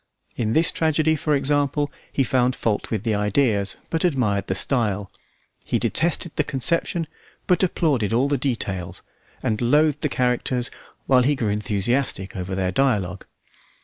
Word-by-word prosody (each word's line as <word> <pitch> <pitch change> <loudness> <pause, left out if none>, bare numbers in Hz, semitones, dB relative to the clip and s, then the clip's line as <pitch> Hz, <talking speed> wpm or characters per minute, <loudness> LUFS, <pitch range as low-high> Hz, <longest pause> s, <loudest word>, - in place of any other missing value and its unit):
In 110 -2 -1
this 165 +2 +4
tragedy, 160 -1 +2
for 150 0 0
example, 145 +1 +1 0.2
he 135 - +1
found 125 0 +1
fault 105 -3 -1
with 110 -3 -2
the 115 - 0
ideas, 105 -1 +1
but 165 - 0
admired 125 - +1
the 95 - -1
style; 105 -4 0 0.5
he - - 0
detested 170 0 0
the 150 - +3
conception, 165 +5 0 0.4
but 180 - +2
applauded 150 - +1
all 125 +4 +2
the 145 - +1
details, 115 -9 -3 0.4
and 110 0 -1
loathed 150 +4 +3
the 150 - 0
characters 125 0 0 0.3
while 130 -2 +4
he 145 +4 +2
grew 115 -6 -1
enthusiastic 105 +1 -1
over 95 0 -4
their 95 -1 0
dialogue. 100 -6 0
125 Hz, 150 wpm, -23 LUFS, 105-145 Hz, 0.5 s, this